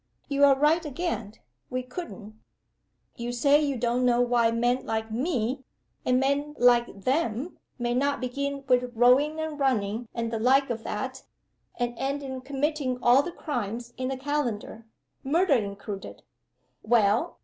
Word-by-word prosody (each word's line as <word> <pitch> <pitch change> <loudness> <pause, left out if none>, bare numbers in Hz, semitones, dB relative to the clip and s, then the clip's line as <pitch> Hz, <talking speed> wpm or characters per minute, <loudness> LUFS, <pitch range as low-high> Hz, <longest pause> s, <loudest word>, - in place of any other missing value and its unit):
You're 280 -1 +5
right 300 +5 +3
again 255 - -4 0.3
we 255 0 -2
couldn't. 250 - -8 0.8
You 240 +1 -3
say 280 +5 +4
you 280 -3 0
don't 240 +1 0
know 245 -1 +3
why 240 -1 +3
men 240 +3 +1
like 220 0 -3
Me, 255 0 -1 0.4
and 250 0 +2
men 285 +2 0
like 240 -4 +3
Them, 265 +2 -1 0.2
may 240 -1 -1
not 280 +3 +1
begin 280 +2 -3
with 250 -1 +2
rowing 265 +7 +4
and 315 -2 -4
running 230 -4 0
and 230 -1 -2
the 225 - -1
like 265 +3 +3
of 225 -1 -4
that, 260 +5 -4 0.5
and 240 -1 -2
end 280 +1 -2
in 260 -1 -5
committing 275 -1 -1
all 245 +2 +5
the 350 - -5
crimes 240 - -4
in 255 0 -3
the 265 0 -3
calendar: 250 -6 -3 0.4
murder 325 +4 +2
included. 200 -3 -4 0.6
Well! 230 +7 +2
255 Hz, 150 wpm, -27 LUFS, 235-280 Hz, 0.8 s, You're